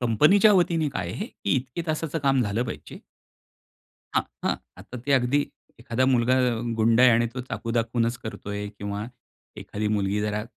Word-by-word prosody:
कंपनीच्या 150 - +5
वतीने 170 -5 +2
काय 90 -10 -4
आहे? - - -4
की 100 - -3
इतके 130 +6 -4
तासाचं 155 0 -1
काम 135 -3 +2
झालं 110 +3 -1
पाहिजे. 125 +9 -8 1.2
हां, - - +3 0.2
हां. - - +1 0.3
आता - - -9
ते 140 - +2
अगदी 130 +2 +3 0.4
एखादा 125 +2 0
मुलगा 120 +1 +3
अ, 125 -3 +1 0.2
गुंड 115 +2 +4
आहे 125 -1 +8
आणि 120 - +2
तो - - -1
चाकू 115 - -4
दाखवूनचं 115 +1 0
करतोय 105 -1 -5
किंवा 100 +1 -4 0.6
एखादी 105 +1 -3
मुलगी 100 +1 0
जरा 105 0 -2
120 Hz, 165 wpm, -25 LUFS, 110-135 Hz, 1.2 s, आहे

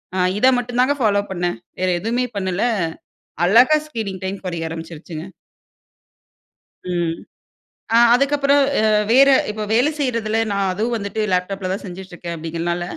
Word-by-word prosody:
அ - - -1 0.2
இத 255 - +5
மட்டும் 245 0 -4
தாங்க 265 +3 +3
ஃபாலோ 205 -3 +3
பண்ணேன். 175 -1 -2 0.2
வேற 185 0 +1
எதுவுமே 240 +4 0
பண்ணல, 190 -1 -1 0.8
அழகா 245 - +6
ஸ்க்ரீனிங் 205 -8 -5
டைம் 195 +1 -3
குறைய 170 -3 -3
ஆரம்பிச்சுருச்சுங்க. 165 0 -8 1.7
ம். 170 -2 0 0.8
அ 230 - +7 0.2
அதுக்கப்புறம் 280 +1 +3 0.2
அ - - +1 0.3
வேற 270 +3 +6 0.2
இப்போ 210 0 -4
வேலை 250 +6 +3
செய்யறதில 230 -5 0
நான் 200 -1 0
அதுவும் 225 +5 -1
வந்துட்டு 200 0 -4
லேப்டாப்ல 185 +1 -1
தான் 195 - -5
செஞ்சுட்டு 185 0 -9
இருக்கேன். 170 -1 -6
அப்படிங்கிறனால 170 +2 -3
200 Hz, 140 wpm, -20 LUFS, 175-240 Hz, 1.7 s, அ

